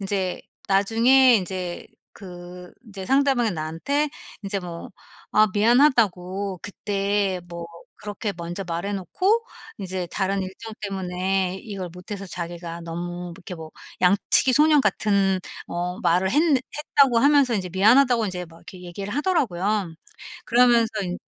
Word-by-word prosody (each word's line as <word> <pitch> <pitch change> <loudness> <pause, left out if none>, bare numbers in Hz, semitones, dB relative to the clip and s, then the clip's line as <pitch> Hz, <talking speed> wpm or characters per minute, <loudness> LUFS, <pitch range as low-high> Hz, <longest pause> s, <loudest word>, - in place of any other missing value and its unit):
인제 190 -2 -2 0.3
나중에 230 +6 +5
인제 185 -2 -4 0.3
그 180 -1 -11
인제 195 -3 -8
상대방이 270 -4 +2
나한테 170 - -2 0.3
인제 200 0 -2
뭐 175 -2 -8 0.4
"아 215 +1 +5
미안하다."고 205 -6 +2
"그때 200 -2 -1
뭐 170 -1 -7 0.3
그렇게 205 0 -4
먼저 170 +3 -5
말해놓고 200 - -1 0.3
인제 185 -2 -4
다른 195 0 0
일정 190 +4 -8
때문에 190 -1 -1
이걸 195 -4 -6
못해서 195 +3 -8
자기가 170 -1 -6
너무 165 +1 -5
뭐 175 0 -6
이렇게 185 -1 -8
뭐 160 -1 -9 0.3
양치기 195 +7 +3
소년 300 +2 +5
같은 200 -3 +1 0.3
어 175 +1 -3
말을 180 +3 +2
했는 300 +2 +4
했다."고 270 -1 +2
하면서 280 -1 +4
인제 190 -4 -2
"미안하다."고 235 +5 +4
인제 180 -2 -5
막 165 0 -16
이렇게 180 +1 -12
얘기를 195 +4 -6
하더라고요. 210 - 0 0.5
그러면서 240 -1 +4
인 180 -1 -4
195 Hz, 300 characters per minute, -24 LUFS, 180-230 Hz, 0.5 s, 나중에